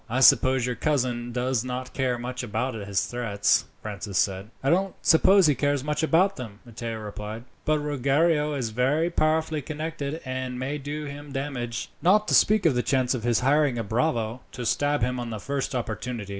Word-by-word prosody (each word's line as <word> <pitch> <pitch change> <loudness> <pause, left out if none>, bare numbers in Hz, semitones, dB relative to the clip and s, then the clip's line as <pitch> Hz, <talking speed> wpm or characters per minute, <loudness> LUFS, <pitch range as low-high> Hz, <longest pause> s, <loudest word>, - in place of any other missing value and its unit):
"I 125 +4 0
suppose 130 -1 +6
your 125 - -1
cousin 125 -5 -1
does 125 -1 0
not 130 0 -5
care 130 -2 0
much 125 +1 -5
about 125 +2 -2
his 100 -3 -1
threats," 115 -5 +1 0.2
Francis 100 -2 -4
said. 95 +1 0
"I 135 - +2
don't 190 +2 +1
suppose 190 +4 +6
he 150 - +5
cares 145 -1 0
much 150 +1 -1
about 180 +5 +3
them," 115 -6 -7
Matteo 115 -1 -5
replied; 105 +1 -7 0.2
"but 155 0 +3
Ruggiero 150 +2 +1
is 120 -5 -2
very 140 +9 +1
powerfully 155 -1 +1
connected, 155 0 -4
and 130 -1 -4
may 135 +4 -3
do 150 +2 -5
him 145 0 -8
damage, 135 -4 -4
not 210 +4 +4
to - - +1
speak 215 -2 +4
of 160 - +5
the 125 - +1
chance 130 -1 +1
of 125 - -3
his 120 +1 +1
hiring 140 -1 +3
a 115 - -1
bravo 115 +1 -1
to 125 -2 -5
stab 145 +2 +1
him 125 +1 0
on 120 -1 -4
the 110 -2 -5
first 140 +3 -3
opportunity. 115 -2 -4
130 Hz, 190 wpm, -26 LUFS, 120-150 Hz, 0.2 s, suppose